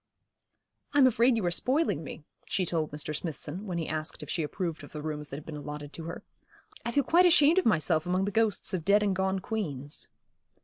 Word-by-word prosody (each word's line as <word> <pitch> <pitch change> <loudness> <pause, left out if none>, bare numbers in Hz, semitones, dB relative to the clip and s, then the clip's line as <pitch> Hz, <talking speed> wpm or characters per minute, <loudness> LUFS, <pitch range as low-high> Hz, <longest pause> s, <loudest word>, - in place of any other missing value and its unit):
'I'm 285 -2 +6
afraid 245 0 +4
you 210 - -1
are 175 - +1
spoiling 255 - +1
me,' 145 - -8 0.2
she 185 - 0
told 160 -2 0
Mr. 150 +1 -4
Smithson, 165 +5 -5
when 180 -2 -2
he 165 - -2
asked 155 0 -4
if - - -6
she 170 - -1
approved 165 +1 -3
of - - -12
the 150 - -5
rooms 150 -1 -4
that - - -6
had 145 - -8
been 160 - -7
allotted 150 0 -7
to 165 - -7
her. 170 - -6 0.6
'I - - -2
feel 285 - +3
quite 350 +7 +5
ashamed 335 0 +6
of 370 - +1
myself 160 -4 +2
among 185 +2 +1
the 205 - -2
ghosts 220 -2 +1
of 180 -4 -1
dead 205 +4 +4
and 200 -2 +1
gone 190 +1 0
queens.' 155 - -4
180 Hz, 220 wpm, -29 LUFS, 155-220 Hz, 0.6 s, I'm